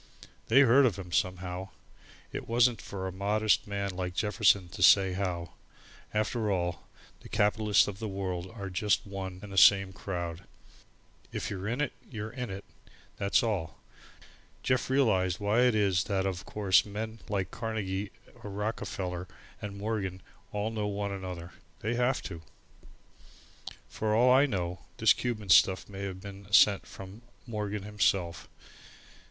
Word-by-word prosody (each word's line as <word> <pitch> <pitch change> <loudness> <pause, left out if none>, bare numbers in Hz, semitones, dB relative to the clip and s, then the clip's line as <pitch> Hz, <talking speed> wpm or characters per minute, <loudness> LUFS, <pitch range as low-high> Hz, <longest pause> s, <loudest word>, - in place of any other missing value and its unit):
They 130 +5 +6
heard 135 +1 +6
of 110 - -1
him, 90 -3 -8
somehow, 90 -1 -2 0.6
it - - -5
wasn't 115 -2 +3
for 95 -1 -6
a 95 - -3
modest 105 +4 +1
man 100 -1 -2
like 90 -1 -4
Jefferson 100 -2 +3
to 100 +2 -8
say 95 0 +6
how. 90 -3 -3 0.6
After 110 +1 0
all, 90 -3 -2 0.3
the - - -13
capitalists 105 0 +3
of 100 -1 -6
the 110 - -3
world 95 -2 -4
are 100 -4 -7
just 105 +4 +1
one 95 -2 -6
and 105 - -9
the 95 - +4
same 95 0 +6
crowd. 85 -3 -5 0.9
If 110 - -4
you're 95 0 -4
in 120 +6 -1
it, 150 - -1 0.2
you're 110 -3 -5
in 125 -1 -5
it, 95 +1 -7 0.5
that's 100 +3 +2
all! 100 -9 -2 0.9
Jeff 130 -1 +1
realized 95 -10 +2
why 105 +3 +1
it 120 - +2
is 100 -3 +2
that 95 -2 0
of 95 -2 -3
course 100 -3 +3
men 110 +2 -6
like 95 -2 -1
Carnegie 105 -3 -3 0.3
or 105 - -7
Rockefeller 95 -3 -4 0.3
and 100 -1 -6
Morgan 100 -3 -3 0.3
all 105 +2 -2
know 105 -2 -2
one 100 0 -2
another. 90 -3 -6 0.3
They 110 +3 -1
have 125 +2 +1
to. 85 -3 -7 1.5
For 110 -1 -1
all 125 +3 +5
I 135 +3 +5
know, 90 -6 -3 0.2
this - - +6
Cuban 110 -5 -4
stuff 95 +1 +5
may 100 -1 -8
have 95 -1 -6
been 100 0 -10
sent 100 0 +5
from 95 +3 -10 0.2
Morgan 105 -3 -4
himself. 100 -4 0
100 Hz, 155 wpm, -30 LUFS, 95-110 Hz, 1.5 s, They